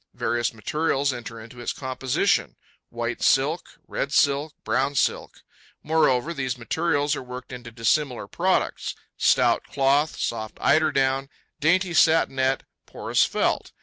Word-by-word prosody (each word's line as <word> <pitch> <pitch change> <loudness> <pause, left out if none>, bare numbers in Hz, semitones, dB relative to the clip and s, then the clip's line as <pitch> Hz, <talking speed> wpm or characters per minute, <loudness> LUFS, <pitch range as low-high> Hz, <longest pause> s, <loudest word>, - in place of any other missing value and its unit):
Various 120 0 0
materials 140 +4 -1
enter 115 -1 -8
into 115 +2 -12
its 120 - -2
composition: 130 -1 0 0.3
white 120 0 -4
silk, 145 +6 +1
red 140 - -3
silk, 145 +1 +2
brown 130 +5 0
silk; - - -1 0.4
moreover, 155 -1 +2
these 130 -4 -3
materials 145 +4 0
are - - -5
worked 125 0 -9
into 120 -1 -8
dissimilar 125 +3 0
products: - - -1 0.2
stout - - +3
cloth, 140 +3 +1
soft 110 -2 -3
eiderdown, 135 -3 +2 0.3
dainty 180 +4 +2
satinette, 135 -6 +3 0.2
porous - - +1
felt. - - -1
135 Hz, 120 wpm, -24 LUFS, 125-150 Hz, 0.4 s, stout